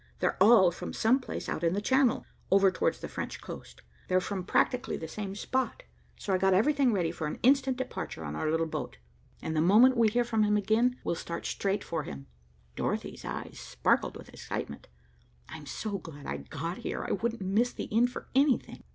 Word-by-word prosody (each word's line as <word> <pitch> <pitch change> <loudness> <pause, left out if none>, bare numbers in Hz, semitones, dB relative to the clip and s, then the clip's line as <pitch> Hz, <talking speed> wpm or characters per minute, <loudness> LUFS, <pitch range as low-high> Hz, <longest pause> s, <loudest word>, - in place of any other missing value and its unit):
They're - - -1
all 200 -4 +7
from 175 - -7
some 240 +5 +3
place 255 - -6
out 155 - -3
in 165 0 +2
the 200 - 0
Channel, 260 +3 +2 0.2
over 195 0 +5
towards 185 - -1
the - - -4
French - - -5
coast. - - -10 0.2
They're 185 - +3
from 190 0 -3
practically 250 +6 +1
the 160 - -6
same 195 +3 -5
spot, 260 - -2 0.3
so 195 - -2
I 185 - +2
got 190 0 +4
everything 275 +5 +3
ready 180 -6 0
for 155 - -4
an - - -4
instant 265 0 +4
departure 260 - -5
on 75 0 -4
our 155 - -1
little 165 +1 +1
boat, 160 - -5 0.5
and 160 - -2
the 155 - +3
moment 220 +9 +6
we 230 -2 +4
hear 240 +3 +2
from 230 -2 0
him 210 0 +3
again, 225 +5 +2
we'll - - 0
start 170 0 -5
straight 195 +1 -1
for 165 -2 -3
him." 70 - -8 0.5
Dorothy's - - -3
eyes - - -6
sparkled - - 0
with - - -12
excitement. 70 - -6 0.6
"I'm 155 -2 -9
so 205 +3 -4
glad 145 -5 -11
I 70 - -3
got 165 - -5
here. - - -4
I - - -3
wouldn't 230 +1 -1
miss 210 +6 +2
the - - -6
end 240 +2 +4
for - - -8
anything." 270 0 +2
200 Hz, 205 wpm, -29 LUFS, 170-245 Hz, 0.6 s, all